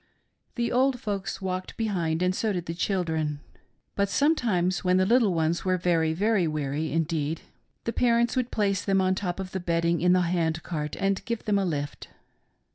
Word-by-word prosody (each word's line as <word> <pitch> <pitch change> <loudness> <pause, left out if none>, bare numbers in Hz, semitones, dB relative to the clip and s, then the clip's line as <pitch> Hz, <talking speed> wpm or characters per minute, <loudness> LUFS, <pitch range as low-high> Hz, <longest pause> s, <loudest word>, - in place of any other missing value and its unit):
The 235 -1 -1
old 255 +1 +2
folks 200 -3 -4
walked 185 0 -4
behind, 180 -7 0
and 180 0 +2
so 215 +3 0
did 175 -3 -3
the 165 - -4
children, 160 -5 -1 0.6
but 200 -1 +1
sometimes, 210 - +1
when 180 0 +3
the 185 - +3
little 230 -1 +4
ones 165 0 0
were 185 -1 +1
very 165 -3 +1 0.3
weary 150 0 -2
indeed, 160 -1 -1 0.4
the 230 - -2
parents 235 -1 +2
would 250 -1 0
place 200 -2 0
them 195 -1 +2
on 185 0 +2
the 190 - -3
top 180 -2 -3
of 185 -1 -5
the 190 - -3
bedding 170 -1 0
in 180 +1 +4
the 185 - +4
hand 170 -2 0
cart 150 -4 -4
and 195 0 0
give 235 -1 -3
them 205 -2 +2
a 195 - 0
lift. 145 -4 -4
185 Hz, 190 wpm, -27 LUFS, 165-200 Hz, 0.6 s, little